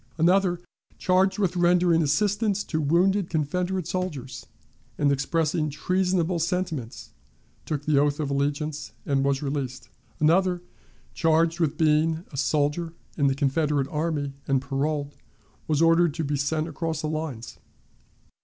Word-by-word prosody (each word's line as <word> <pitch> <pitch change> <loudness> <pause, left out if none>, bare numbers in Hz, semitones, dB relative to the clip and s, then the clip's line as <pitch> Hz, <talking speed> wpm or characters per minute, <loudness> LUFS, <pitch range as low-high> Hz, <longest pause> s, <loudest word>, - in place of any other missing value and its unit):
Another, 175 +1 +3 0.4
charged 185 +2 +2
with 190 -4 0
rendering 175 -1 +3
assistance 205 +6 +1
to 160 -2 -2
wounded 180 +5 +2
Confederate 180 +3 -1
soldiers, 150 -9 -4 0.5
and 145 -1 +2
expressing 155 +2 0
treasonable 180 +3 0
sentiments, 165 - -3 0.6
took 145 -2 -3
the 150 -2 +3
oath 145 +1 +1
of 145 -2 -2
allegiance 145 -2 -2
and 135 -1 +1
was 140 0 0
released. 135 -3 -4 0.3
Another, 180 +3 +2 0.5
charged 165 +1 +2
with 160 -4 0
being 160 +2 +2
a 140 - -8
soldier 150 +4 0 0.2
in 145 -3 +2
the 135 - +1
Confederate 145 0 +1
army 150 -3 -2
and 135 -1 +2
paroled, 140 +2 -2 0.5
was 155 0 +2
ordered 165 -2 +4
to 165 - -2
be 145 0 -1
sent 155 +3 -1
across 160 0 -3
the 155 - -2
lines. 155 -7 -5
155 Hz, 135 wpm, -25 LUFS, 145-175 Hz, 0.6 s, ordered